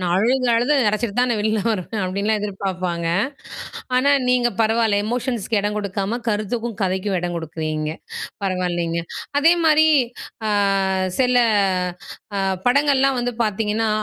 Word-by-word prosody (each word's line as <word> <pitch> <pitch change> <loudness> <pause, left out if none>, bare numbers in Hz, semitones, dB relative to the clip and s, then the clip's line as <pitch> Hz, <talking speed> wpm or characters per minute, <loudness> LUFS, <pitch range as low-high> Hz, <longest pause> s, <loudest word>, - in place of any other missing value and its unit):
நான் 175 -1 0
அழுது 250 +5 +2
அழுது 245 +6 +2
அடைச்சிட்டு 215 0 -1
தான், 250 0 +3
நான் 225 - 0
வெளில 215 0 +1
வருவேன்." 205 +1 -2
அப்படின்லாம் 200 +4 0
எதிர்பார்ப்பாங்க. 185 -4 -3 0.9
ஆனா, 280 +3 +3 0.2
நீங்க 250 -1 +3
பரவால்ல. 220 -2 +2
எமோஷன்ஸ்க்கு 235 -2 -1
இடம் 210 +1 -2
கொடுக்காம 200 +3 -2
கருத்துக்கும், 220 +2 -2
கதைக்கும் 190 +1 0
இடம் 175 0 -3
கொடுக்குறீங்க. 155 -1 -3 0.5
பரவாயில்லங்க. 175 -3 -1 0.4
அதேமாதிரி, 320 -1 +5 0.6
அ - - 0 0.7
சில 250 -1 +3 1.0
அ - - 0 0.3
படங்கள்லாம் 275 0 +3
வந்து 245 -1 -2
பார்த்தீங்கன்னா, 215 +1 0
215 Hz, 120 wpm, -21 LUFS, 185-245 Hz, 1.0 s, அதேமாதிரி